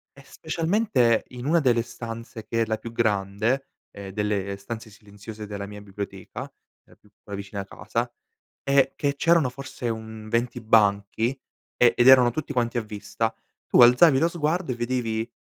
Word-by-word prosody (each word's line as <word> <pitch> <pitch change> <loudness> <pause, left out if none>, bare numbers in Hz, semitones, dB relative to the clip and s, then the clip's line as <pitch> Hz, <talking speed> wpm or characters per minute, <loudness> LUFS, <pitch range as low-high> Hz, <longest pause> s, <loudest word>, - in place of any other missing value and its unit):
E 140 - -15
specialmente 160 - +1
in 125 0 -8
una 170 +2 +4
delle 120 -5 +3
stanze 115 -1 -8
che 115 0 -1
è - - -2
la 110 0 -1
più 115 +1 -8
grande, 110 +3 0 0.3
ehm, 100 -1 -9
delle 100 -1 -2
stanze 110 +3 -8
silenziose 105 +1 -10
della 100 -1 -5
mia 105 0 -9
biblioteca, 100 -1 -7 0.4
la - - -21
più 105 - -26 0.3
vicina 100 0 -6
a 95 - -8
casa - - -4 0.5
è 140 -1 +3
che 140 -1 0
c'erano 165 -3 +3
forse 130 -2 -7
un 110 -1 -6
20 120 +2 -1
banchi 105 0 +3 0.5
e 120 -1 +5
ed 120 - +4
erano 125 -2 +7
tutti 150 +3 -4
quanti 120 -2 0
a - - +1
vista, 110 +1 -3 0.3
tu - - +5
alzavi 130 +4 +7
lo 165 - +3
sguardo 165 -2 -1
e - - -7
vedevi 120 -1 -2
115 Hz, 165 wpm, -25 LUFS, 105-130 Hz, 0.5 s, erano